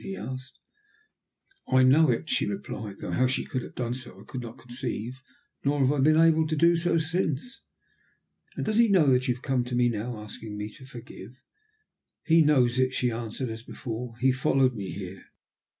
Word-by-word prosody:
he 95 - -5
asked. 130 +6 -7 1.1
"I 130 0 +4
know 150 +5 +6
it," 120 +6 0
she - - +1
replied, 105 0 -5
though - - -6
how 130 0 +2
she 130 - -1
could 130 - -3
have - - -10
done 120 -1 -2
so 130 -1 -8
I - - -12
could 130 - -6
not 115 -1 -9
conceive, 120 0 -5 0.4
nor 145 +1 +1
have 135 0 +4
I 145 - 0
been 155 +3 +5
able 160 -1 +5
to 155 - -1
do 170 +3 +4
so 170 0 +1
since. 165 - -2 0.9
"And - - -3
does 215 0 0
he 235 0 +6
know 190 -7 +4
that 125 +1 +2
you 125 - +1
have 125 - -16
come 130 -3 +1
to 125 0 -3
me 120 0 +3
now 115 +1 -3
asking 105 0 -8
me 105 +1 -4
to 130 +5 -14
forgive?" 125 0 -11 0.8
"He 165 0 +5
knows 130 -5 +3
it," 130 0 +2
she 125 -1 +1
answered, 115 +2 -4
as 110 0 -6
before. 115 0 -6
"He 130 +2 +3
followed 130 0 +2
me 100 -5 -5
here." 95 -1 -7
130 Hz, 200 wpm, -27 LUFS, 120-145 Hz, 1.1 s, know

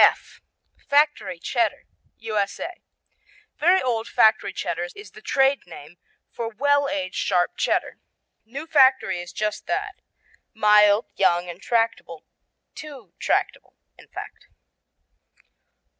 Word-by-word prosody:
F - - +3 0.5
Factory 285 - +2
Cheddar 230 +4 -1 0.3
U.S.A. 220 - -3 0.8
Very 360 +4 +4
Old 235 -3 -1
Factory 220 -2 +3
Cheddar 175 -1 -3
is 415 - -12
the - - -14
trade 270 -4 +1
name 165 0 -12 0.3
for 230 -1 -4
well 285 +5 +1
aged 185 -1 -3
sharp 180 -2 +1
Cheddar. - - -1 0.4
New 275 +7 -8
Factory 265 - +3
is 175 0 -8
just 210 0 -3
that - - -3 0.5
mild, 210 0 +5
young 175 -2 +2
and 175 +1 -9
tractable 230 -8 -1 0.5
too 270 - -11
tractable, - - -1 0.2
in - - -18
fact. - - -10
220 Hz, 115 wpm, -23 LUFS, 185-270 Hz, 0.8 s, mild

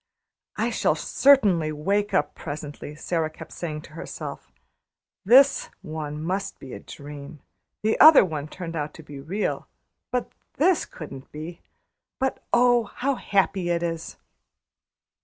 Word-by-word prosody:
"I - - 0
shall - - +2
certainly 205 - +4
wake 200 +7 0
up 190 - +1
presently," 145 -1 -7
Sara 160 0 -1
kept 155 - -12
saying 155 -3 -5
to - - -14
herself. 150 - -7 0.7
"This 265 +7 +6
one 155 -1 -5
must 190 +4 -2
be 130 - -10
a - - -6
dream. 145 +1 -10 0.4
The 220 +1 +1
other 310 -8 +10
one 155 -4 -4
turned 165 0 -7
out 150 -1 -3
to 160 - -11
be 145 -2 -10
real; 180 +10 -2 0.4
but 250 -1 -2 0.2
this 350 +4 +3
couldn't 135 -4 -10
be. 160 +3 -8 0.6
But, 265 0 -2
oh! 245 -1 +4
how 265 +6 -1
happy 195 -6 0
it 170 0 0
is!" 165 -1 -4
165 Hz, 140 wpm, -25 LUFS, 150-205 Hz, 0.7 s, other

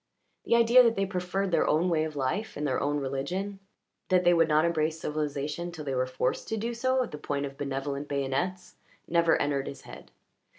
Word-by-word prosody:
The - - +3
idea 235 +2 +7
that 230 -2 +3
they 195 - +1
preferred 190 0 -2
their - - +2
own 165 +4 +2
way 160 -3 +1
of 155 -1 -6
life 145 +11 -2
and 150 - -2
their 130 -3 0
own 145 +1 0
religion, 145 +9 -3 0.5
that 185 -1 +4
they 175 0 +5
would 165 -1 +4
not 155 +1 +3
embrace 160 -1 0
civilization 150 +2 -3
till 160 -3 -8
they 135 - -2
were 130 0 0
forced 130 0 -2
to 225 - -2
do 230 +3 -2
so 255 +2 +1
at 240 - -7
the 150 - -7
point 140 -1 -2
of 135 -1 -7
benevolent 140 +1 -3
bayonets, 140 +7 -2 0.3
never 170 -1 +3
entered 140 -1 0
his 140 - -7
head. - - -12
155 Hz, 210 wpm, -28 LUFS, 140-185 Hz, 0.5 s, idea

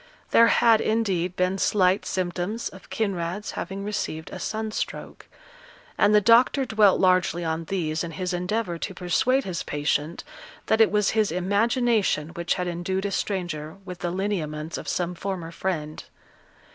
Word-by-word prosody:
There 230 - +7
had, 230 -1 +5
indeed, 190 -6 0
been 185 +1 0
slight 190 -1 +2
symptoms 185 +4 -2
of 190 - -15
Kinraid's 195 -1 -2
having 195 0 -5
received 180 -6 -4
a - - -7
sun 220 0 -3
stroke; - - -5 0.7
and 210 - +4
the - - +8
doctor 235 +6 +4
dwelt 215 -4 +4
largely 185 -2 +2
on 160 +1 -2
these 160 -3 -2
in 165 -1 -6
his 180 +3 -3
endeavour 180 0 -2
to 190 - -5
persuade 250 +10 +1
his 180 -6 -4
patient 150 +2 -2 0.4
that 220 - +3
it 220 - +6
was 210 -1 +2
his 215 -4 +1
imagination 205 - +1
which 170 0 -2
had 180 -1 -2
endued 175 +3 -2
a 200 - -1
stranger 175 -7 -3
with 180 -2 -8
the 175 - -2
lineaments 170 -5 -3
of - - -6
some 180 0 -1
former 175 -2 -5
friend. 155 -4 -4
185 Hz, 160 wpm, -25 LUFS, 170-210 Hz, 0.7 s, the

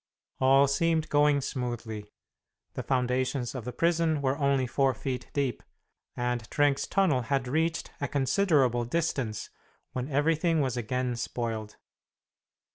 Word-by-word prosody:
All 135 +1 +5
seemed 160 +2 +1
going 145 -1 +4
smoothly. 120 -6 -4 0.6
The - - -4
foundations 125 -1 0
of 125 -4 -6
the 125 - -3
prison 165 +2 +1
were 135 0 +2
only 140 -2 +2
four 135 +1 +1
feet 130 +2 -4
deep, 140 -4 -1 0.6
and 120 -2 -2
Trenck's 145 -2 +2
tunnel 180 -10 +2
had 130 +2 -1
reached 160 +4 -1
a 140 - 0
considerable 135 -4 +2
distance 120 -6 -2 0.4
when 130 +2 -4
everything 160 +3 +2
was 130 -4 0
again 125 +1 -1
spoiled. 115 -3 -4
135 Hz, 125 wpm, -28 LUFS, 125-150 Hz, 0.6 s, All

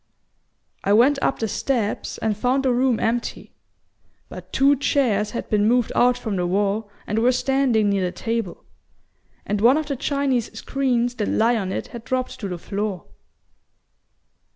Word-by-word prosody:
I 200 - +2
went 265 +6 +4
up - - +1
the 225 - -2
steps 220 0 -2
and 220 -1 -1
found 255 +5 0
the 255 - +3
room 250 -2 +2
empty; 235 +1 -2 0.8
but - - -10
two 275 +2 +4
chairs 235 -7 +1
had 235 - -5
been 210 -1 +2
moved 245 0 +2
out 245 0 +4
from 220 -5 -3
the 180 -1 0
wall 200 +3 0 0.2
and 210 +2 -1
were 245 +3 +4
standing 250 -5 +2
near 195 -2 +1
the 180 - -2
table; 225 -4 -4 0.8
and 205 0 -1
one 245 +6 +6
of 310 - -1
the 285 -1 -3
Chinese 270 -3 -1
screens 245 -2 0
that 210 - -1
lie 230 +2 +2
on 195 -4 -2
it - - -4
had 235 -1 -9
dropped 255 0 -3
to 205 - -4
the 180 -2 -4
floor." 200 0 -4
235 Hz, 170 wpm, -22 LUFS, 210-255 Hz, 0.8 s, one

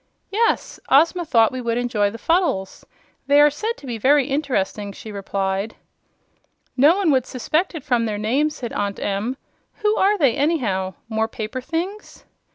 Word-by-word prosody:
"Yes; 455 +3 0
Ozma 330 +6 +4
thought 230 -7 +4
we 255 - -5
might 235 -1 -1
enjoy 235 -4 +1
the 225 - -8
Fuddles. 325 - 0 0.4
They 285 +1 +5
are 295 0 +6
said 440 +10 -3
to - - -13
be 235 -3 -4
very 280 +4 +4
interesting," 245 -8 -2
she 215 - -9
replied. 195 +1 -2 1.0
"No 295 +8 +5
one 380 -6 +2
would 260 -3 +2
suspect 315 +8 -1
it 310 - -6
from 245 -5 +1
their 215 -2 -2
name," 255 +9 +1
said 260 -6 -7
Aunt 200 -1 -2
Em. 205 +6 -2 0.5
"Who 420 0 +3
are 410 +2 +3
they, 275 - +3
anyhow? 230 - 0
More 220 -1 0
paper 225 +3 -5
things?" 360 +9 -5
255 Hz, 165 wpm, -21 LUFS, 215-310 Hz, 1.0 s, are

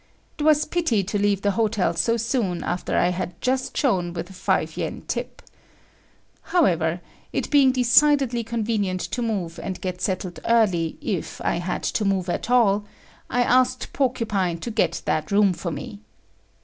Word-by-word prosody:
It - - -8
was 305 0 +4
pity 305 - +1
to 205 +2 -2
leave 200 -1 +1
the 205 - +3
hotel 205 -4 +1
so 200 +8 +1
soon 225 -6 -1
after 175 +1 -2
I 175 - +3
had 180 -1 -4
just 260 0 -1
shone 180 -10 +1
with 175 +2 -6
a - - -11
5 185 - -1
yen - - -4
tip. - - -4 1.0
However, 175 - +1 0.3
it - - -3
being 280 -3 +6
decidedly 255 0 +3
convenient 215 -5 -1
to 245 - -3
move 195 -8 -2
and 185 - -5
get 180 -1 -5
settled 185 -2 -2
early 190 -9 +2
if 190 -8 -3
I - - 0
had 175 +1 -3
to 215 - -1
move 190 -2 0
at 200 - -3
all, 210 -5 +4 0.5
I 245 0 +2
asked 255 +1 +2
Porcupine 210 -10 0
to 235 - -4
get 220 - 0
that 155 - -1
room 200 -2 +4
for 175 - -4
me. 160 +7 -7
205 Hz, 165 wpm, -23 LUFS, 180-245 Hz, 1.0 s, being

